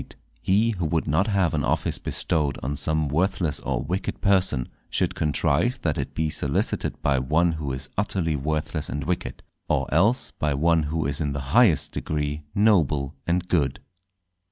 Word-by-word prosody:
—_He 105 +4 +3
who 85 -3 -1
would 80 0 0
not 80 +8 +2
have 95 -6 +1
an 75 -2 0
Office - - 0
bestowed 75 -4 -1
on 70 +3 -2
some 75 +1 0
worthless 85 0 0
or - - -2
wicked 90 +5 -3
Person, 95 -10 +2 0.2
should - - 0
contrive 80 - +1
that 80 -3 +1
it - - -4
be 80 -1 0
solicited - - -1
by 70 -2 +2
one 80 +7 +2
who 80 -4 -4
is 65 +1 -3
utterly 90 -6 0
worthless 75 +2 -2
and 75 - -3
wicked, 90 -1 -3 0.3
or - - +1
else 105 - +3
by 75 -2 -1
one 85 +3 +3
who 80 -1 -1
is 70 +2 -1
in 70 -2 -1
the 70 +1 -5
highest 110 - +4
degree 75 0 -3
noble 80 -10 +2
and 90 +1 0
good. 70 -8 +1
80 Hz, 170 wpm, -25 LUFS, 75-90 Hz, 0.3 s, highest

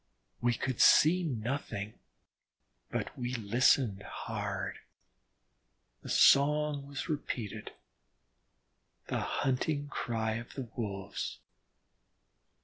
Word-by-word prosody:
We 120 0 +2
could 130 0 -2
see 175 +5 +6
nothing, 120 - -3 1.0
but - - -3
we 125 0 -3
listened 115 -1 +3
hard. - - -4 1.2
The - - -9
song 145 0 +4
was 140 +3 -5
repeated, 130 - -4 1.4
the - - 0
hunting 145 +2 -1
cry 110 -4 -2
of 120 +1 -9
the 130 -4 -5
Wolves. 100 -3 -4
125 Hz, 85 wpm, -32 LUFS, 110-145 Hz, 1.4 s, see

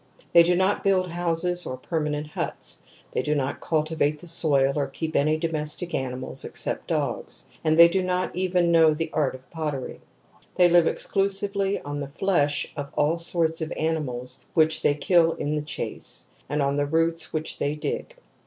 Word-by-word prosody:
They 170 - +9
do 175 +1 +3
not 190 +3 +1
build 185 -3 +2
houses 175 +1 0
or 130 - -5
permanent 150 +1 -2
huts; 150 - -3 0.3
they - - 0
do 150 - -1
not 140 -1 -2
cultivate 155 -1 0
the 175 - -11
soil 140 -5 +3
or 145 -2 0
keep 160 +4 -5
any 155 +2 +2
domestic 160 +1 -2
animals 130 -1 -2
except - - -3
dogs; - - -3 0.2
and 155 0 +2
they 170 0 +10
do 185 +3 0
not 180 -1 -1
even 180 -1 +1
know 160 -2 +5
the 160 0 -3
art 145 -4 0
of 130 0 -14
pottery. 150 -5 -4 0.5
They 180 - +6
live 175 -1 +5
exclu 195 +4 +1
sively 200 0 -1
on 145 0 -5
the 140 - -4
flesh 145 -3 0
of 145 -1 -5
all 150 +3 +2
sorts 165 -1 +1
of 160 - -3
animals 130 -6 -1
which 160 -1 +3
they 145 - +3
kill 165 +1 +3
in 145 - -3
the 150 - -1
chase, 145 -1 -4 0.2
and 145 -1 0
on 140 +1 0
the 145 0 0
roots 165 +1 +2
which 155 0 -3
they 145 +1 -1
dig. 475 - -4
160 Hz, 180 wpm, -25 LUFS, 145-175 Hz, 0.5 s, they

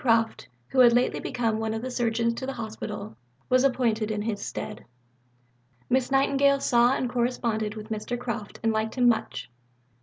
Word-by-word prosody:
Croft, 225 -2 +1 0.2
who 265 - 0
had 240 -2 +8
lately 245 +1 +2
become 225 -2 -1
one 220 0 -2
of 220 - -4
the 255 - -4
Surgeons 235 -1 +1
to 260 +3 -5
the 270 - -3
Hospital, 215 -2 -6 0.3
was 255 0 +4
appointed 235 -5 +1
in 210 -1 -2
his 215 -2 -3
stead. 210 - -6 1.1
Miss 260 0 +2
Nightingale 275 +1 +3
saw 240 -1 +4
and 255 - -1
corresponded 235 -3 -1
with 215 +1 -8
Mr. 220 +3 -3
Croft, 235 -4 -5
and 225 0 +2
liked 220 0 -1
him 250 -2 +3
much. 230 -2 0
235 Hz, 175 wpm, -26 LUFS, 220-250 Hz, 1.1 s, had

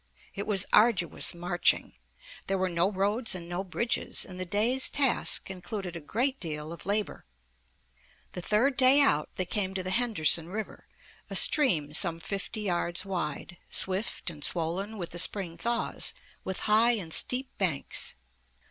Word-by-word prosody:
It 200 - -6
was 200 -3 +2
arduous 210 -7 +3
marching. 175 +1 0 0.5
There 195 - -1
were 185 0 -1
no 170 +3 +1
roads 205 +3 -1
and 170 -2 -7
no 175 +2 -4
bridges, 215 +5 -1
and 185 -2 -10
the 185 - -4
day's 230 +7 +1
task 270 -7 +1
included 190 -1 -7
a - - -5
great 255 - -1
deal 155 -1 -5
of 170 - -10
labor. 205 +1 -2 1.1
The 180 - -6
third 240 +9 +1
day 260 +2 +6
out 155 - +3
they 185 - -2
came 190 0 -2
to 185 - -3
the 185 - -4
Henderson 175 -8 +2
River, 215 +3 -7 0.4
a - - -5
stream 165 - +5
some 165 0 +3
fifty 200 +5 -5
yards 175 -2 -2
wide, 175 -2 -5
swift 190 -1 +1
and 150 -3 -12
swollen 180 +7 -1
with 175 -4 -6
the 175 - 0
spring 180 -2 +2
thaws, 235 +7 -2 0.3
with 190 0 -5
high 220 +3 +3
and 180 -8 -4
steep 255 +1 +1
banks. 170 -8 0
190 Hz, 155 wpm, -28 LUFS, 175-220 Hz, 1.1 s, day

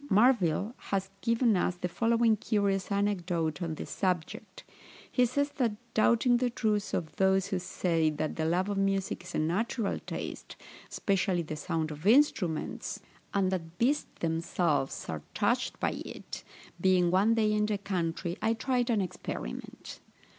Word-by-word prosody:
Marville 210 -2 +3 0.2
has 195 -1 -1
given 230 -1 +3
us 180 0 +1
the 180 0 -3
following 230 +3 +3
curious 200 -2 0
anecdote 180 -5 0
on 165 -2 -2
this - - -7
subject. 180 -4 -2 0.5
He 250 -1 +3
says, 285 +4 0
that 240 -6 +2 0.2
doubting 240 +2 +4
the 250 0 +1
truth 215 -3 0
of 160 -2 -3
those 190 0 +3
who 190 - 0
say 165 -3 +1
that 155 0 -3
the 160 - -1
love 175 +4 +1
of 200 -1 -1
music 195 -1 0
is - - -8
a - - +1
natural 200 +7 0
taste, - - -6 0.3
especially 190 -3 0
the 155 -1 -5
sound 160 0 -2
of 150 +5 -5
instruments, 215 - +2 0.3
and 190 -2 +1
that 165 -2 -4
beasts 270 +6 +2
themselves 165 -3 0
are 80 -2 -4
touched - - 0
by - - +1
it, - - -8 0.4
being 180 -2 +4
one 200 +5 +4
day 215 -2 +2
in 210 0 +2
the 210 -1 0
country 180 -2 -2
I 225 +1 +2
tried 245 +1 0
an 220 -4 +2
experiment. 110 - -6
195 Hz, 155 wpm, -30 LUFS, 170-225 Hz, 0.5 s, doubting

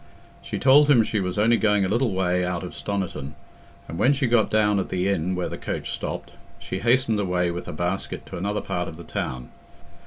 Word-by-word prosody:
She - - -5
told 145 +2 +6
him 120 -6 +6
she 105 0 -1
was 90 -1 -2
only 115 +3 +4
going 105 -3 +2
a - - 0
little 115 +4 +1
way 90 -1 +1
out 90 -2 -2
of - - -7
Stoniton, 95 -8 -4 0.5
and 85 - -6
when 135 - +4
she 140 -1 0
got 120 -3 +3
down 105 -2 +3
at 95 - -3
the 90 0 0
inn 95 -2 0
where 90 -1 -1
the - - -6
coach - - -4
stopped, - - -5 0.3
she - - -5
hastened 120 -2 +2
away 90 -3 0
with 85 +1 -6
her - - -4
basket 90 +2 -3
to - - -8
another 100 +3 -2
part 90 0 -3
of 80 - -8
the 85 - -9
town. 65 -5 -4
100 Hz, 220 wpm, -24 LUFS, 90-110 Hz, 0.5 s, told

